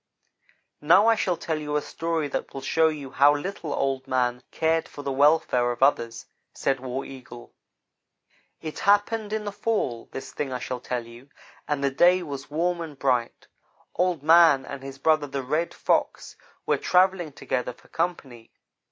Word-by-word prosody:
"Now 175 +8 +5
I 230 - +6
shall 185 -6 0
tell 160 -1 -3
you 150 -1 -4
a 150 - +2
story 165 -2 -2
that - - -4
will 135 - -5
show 160 +4 +3
you 145 -4 -4
how 145 +2 +5
little 165 0 -5
Old 135 -1 -1
man 125 -1 0
cared 160 0 0
for 145 - -10
the 140 - -2
welfare 135 -3 +3
of 120 +2 -1
others," 115 -4 +1 0.3
said 135 -1 0
War 130 +1 -4
Eagle. 120 -3 -11 1.1
"It 155 -1 -6
happened 205 +1 +2
in 215 -1 -2
the 205 - -3
fall, 200 - -2
this 135 - -7
thing 140 -3 -4
I 125 - -2
shall 125 0 -5
tell 120 -1 -4
you, 120 +4 -14 0.4
and 145 -2 -1
the 140 - +2
day 180 +6 +4
was 140 -4 -7
warm 170 +3 -1
and 155 -4 -7
bright. 125 -3 -1 0.5
Old 180 -4 0
man 160 -4 +6
and 140 0 -7
his 135 0 -8
brother 155 +1 +2
the 135 -1 -4
Red 155 +6 -1
Fox - - -1 0.3
were - - +2
travelling 180 -3 +2
together 125 -2 -3
for 120 - -20
company. 140 -9 -4
145 Hz, 175 wpm, -25 LUFS, 130-170 Hz, 1.1 s, I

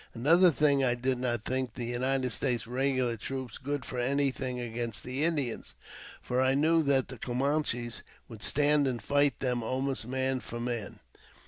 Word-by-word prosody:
Another 165 +10 +5
thing: 145 -3 +3
I 125 -2 +2
did 130 +1 -1
not 120 -3 -1
think 130 -1 -2
the 120 - -3
United 130 +1 0
States 120 -1 0
regular 130 -1 0
troops 130 0 -5
good 145 0 -3
for 125 - -4
anything 130 -1 0
against 120 -1 -4
the 130 +4 -1
Indians, 145 -8 0 0.5
for 125 +1 0
I 130 +1 +3
knew 160 +3 +3
that 140 -3 +2
the 130 -3 -9
Camanches 125 -2 -1 0.3
would 110 -3 -11
stand 145 +2 +3
and 125 -3 -1
fight 145 +4 +1
them 125 -2 0
almost 130 +1 -2
man 130 0 0
for 120 -1 -7
man. 120 -2 -4
130 Hz, 165 wpm, -30 LUFS, 120-140 Hz, 0.5 s, Another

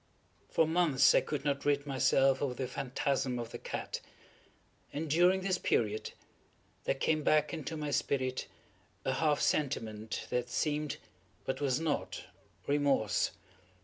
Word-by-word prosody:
For 165 - +3
months 160 -5 +4
I - - +5
could 145 -2 -4
not 140 -1 0
rid 145 0 +1
myself 135 -1 +3
of 130 -3 -1
the 130 - -2
phantasm 135 -1 -1
of 120 -1 -5
the - - -6
cat; - - -4 0.9
and, 155 +3 -3
during 175 +5 +4
this 185 -1 0
period, 110 -1 0 0.7
there - - +1
came 155 -1 +1
back 150 +1 +3
into 160 0 -4
my 150 -1 -3
spirit 130 -2 0 0.6
a 130 - +1
half 150 +1 +2
sentiment 110 -7 -1
that 125 0 0
seemed, 150 +2 -1 0.5
but 130 - -2
was 135 -1 +1
not, 140 - -2 0.4
remorse. 140 -7 +2
140 Hz, 140 wpm, -32 LUFS, 130-150 Hz, 0.9 s, I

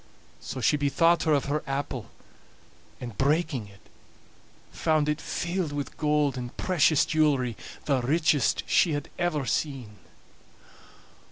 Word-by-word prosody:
So 130 - -6
she 150 - +3
bethought 165 +4 +3
her 155 - +3
of 140 - 0
her 150 +2 -1
apple, 135 -3 -3 0.9
and 120 -4 -7
breaking 145 -4 +1
it, 100 0 -18 0.9
found 155 -2 +1
it 150 0 -1
filled 175 -2 -2
with 145 -2 -5
gold 150 -3 +1
and 120 -1 -7
precious 160 -4 +3
jewelry, 140 -7 +1 0.3
the 135 -3 +1
richest 150 +1 +2
she 165 - +3
had 145 -1 -3
ever 155 -6 0
seen. 130 -8 -3
145 Hz, 125 wpm, -27 LUFS, 130-155 Hz, 0.9 s, she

